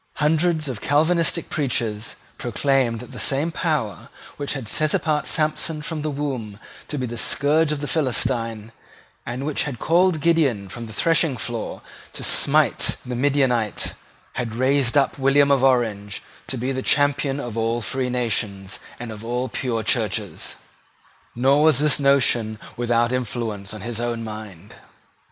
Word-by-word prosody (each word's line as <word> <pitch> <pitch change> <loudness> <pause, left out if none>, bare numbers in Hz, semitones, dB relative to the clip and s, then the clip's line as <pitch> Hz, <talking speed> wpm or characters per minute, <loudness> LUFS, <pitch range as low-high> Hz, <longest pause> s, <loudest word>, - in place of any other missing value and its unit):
Hundreds 155 +1 +2
of 125 -5 -5
Calvinistic 165 +3 +2
preachers 115 -6 -1 0.2
proclaimed 120 -1 +1
that 125 - -11
the - - -8
same 145 +4 +1
power 155 - -2 0.3
which 145 -1 -3
had 135 -6 -5
set 155 +7 +2
apart 150 -1 0
Samson 155 0 0
from 160 -2 -4
the 155 - -2
womb 135 -8 -4 0.3
to 150 - -4
be 130 - -1
the 120 -1 -5
scourge 150 +5 +3
of 150 -1 -2
the 145 - -3
Philistine, 115 -7 0 0.6
and 125 +3 -3
which 150 -1 0
had 140 -5 -4
called 175 +4 +3
Gideon 140 - +2
from 115 +3 -7
the - - -10
threshing 165 -1 +2
floor 120 -2 -5 0.3
to - - -6
smite - - +3
the 125 0 -4
Midianite, 125 -5 +1 0.4
had 115 -3 -3
raised 130 +1 +2
up 140 0 +2
William 140 +1 +4
of 135 -2 +3
Orange 110 -6 +1 0.2
to 130 - -3
be 125 +3 -2
the 130 0 -2
champion 140 0 +2
of 120 -5 -5
all 115 +1 0
free 130 +2 -1
nations 105 -6 -2 0.2
and 120 -1 -6
of 110 0 -9
all 125 +2 -2
pure 115 -2 -2
Churches; 110 -3 -1 0.8
nor 135 +4 +4
was 155 -3 +5
this 150 0 +3
notion 125 -6 +2 0.2
without 120 0 +1
influence 115 -5 -3
on 110 - -8
his 115 +1 -4
own 120 -1 -2
mind. 105 -4 -9
130 Hz, 155 wpm, -23 LUFS, 115-145 Hz, 0.8 s, was